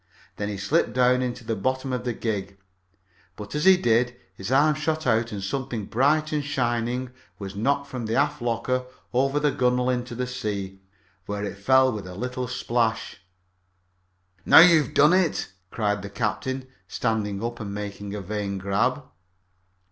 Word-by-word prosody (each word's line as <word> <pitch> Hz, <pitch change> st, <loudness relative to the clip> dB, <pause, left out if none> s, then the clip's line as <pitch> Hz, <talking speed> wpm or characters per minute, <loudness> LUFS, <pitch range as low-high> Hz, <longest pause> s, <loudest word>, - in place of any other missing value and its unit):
Then 100 Hz, 0 st, -2 dB
he 100 Hz, -, -4 dB
slipped 150 Hz, -, +1 dB
down 125 Hz, 0 st, +3 dB
into 125 Hz, -1 st, -3 dB
the 115 Hz, 0 st, -2 dB
bottom 130 Hz, +5 st, -2 dB
of 125 Hz, -1 st, -3 dB
the 120 Hz, -, -1 dB
gig, 100 Hz, -4 st, -3 dB, 0.8 s
but 105 Hz, 0 st, -9 dB
as 150 Hz, +3 st, -1 dB
he 190 Hz, -1 st, +8 dB
did 120 Hz, -5 st, +3 dB
so 120 Hz, -, -15 dB, 0.2 s
his 95 Hz, +4 st, -6 dB
arm 145 Hz, +3 st, +5 dB
shot 155 Hz, +1 st, -2 dB
out 115 Hz, -1 st, +2 dB
and 100 Hz, -2 st, -5 dB
something 120 Hz, 0 st, -3 dB
bright 150 Hz, +8 st, +2 dB
and 150 Hz, -1 st, 0 dB
shining 125 Hz, -2 st, -1 dB, 0.3 s
was 100 Hz, -1 st, -7 dB
knocked 140 Hz, +7 st, 0 dB
from 125 Hz, -5 st, -5 dB
the 110 Hz, -, -1 dB
after 145 Hz, -1 st, +1 dB
locker 125 Hz, +2 st, -1 dB, 0.3 s
over 135 Hz, +3 st, +2 dB
the 150 Hz, -1 st, +2 dB
gunwale 125 Hz, -1 st, +1 dB
into 125 Hz, -1 st, -3 dB
the 125 Hz, +1 st, -2 dB
sea, 100 Hz, -6 st, -4 dB, 0.5 s
where 105 Hz, 0 st, -3 dB
it 100 Hz, -, -5 dB
fell 130 Hz, +4 st, +4 dB
with 105 Hz, -5 st, -6 dB
a 90 Hz, -, -8 dB
little 125 Hz, +3 st, -3 dB
splash. 120 Hz, -2 st, -1 dB, 1.3 s
"Now -, -, +6 dB
you 165 Hz, -1 st, +9 dB
have 135 Hz, -, -7 dB
done 150 Hz, +4 st, +6 dB
it!" 185 Hz, -, +1 dB, 0.2 s
cried 105 Hz, -1 st, -1 dB
the 100 Hz, -, -7 dB
captain, 130 Hz, +5 st, -2 dB, 0.2 s
standing 105 Hz, -1 st, -2 dB
up 120 Hz, 0 st, -4 dB
and 105 Hz, -3 st, -5 dB
making 100 Hz, 0 st, -6 dB
a 105 Hz, -, -4 dB
vain 100 Hz, 0 st, -3 dB
grab. 105 Hz, +9 st, 0 dB
120 Hz, 175 wpm, -25 LUFS, 105-130 Hz, 1.3 s, you